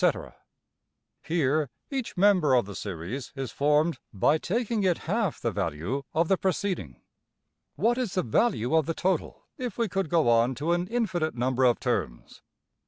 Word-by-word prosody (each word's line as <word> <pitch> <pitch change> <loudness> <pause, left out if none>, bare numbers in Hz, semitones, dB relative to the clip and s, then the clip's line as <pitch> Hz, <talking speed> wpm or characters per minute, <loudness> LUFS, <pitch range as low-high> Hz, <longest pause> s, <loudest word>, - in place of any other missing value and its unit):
} - - -49
\] - - -55
Here 155 -3 +1 0.2
each 265 -7 -4
member 180 -8 +4
of 120 - +3
the 100 - -8
series 100 - -5
is 135 -4 -4
formed 150 +3 +2
by 145 +10 +2
taking 230 +4 -1
it 185 -3 0
half 205 0 0
the 115 - -1
value 85 - -2
of 165 +1 +1
the 195 - +3
preceding. 185 - -2 0.7
What 235 +5 +1
is 230 -7 -2
the 185 - +1
value 140 - +1
of 160 -3 +3
the 165 - -1
total 185 -3 -1 0.2
if 250 -2 -4
we 230 -1 +1
could 195 -4 -2
go 165 -5 +3
on 120 +2 +3
to 150 +7 -1
an 175 +1 -1
infinite 185 -8 -1
number 130 +1 +1
of 120 -1 +3
terms? - - -3
160 Hz, 170 wpm, -27 LUFS, 125-195 Hz, 0.7 s, member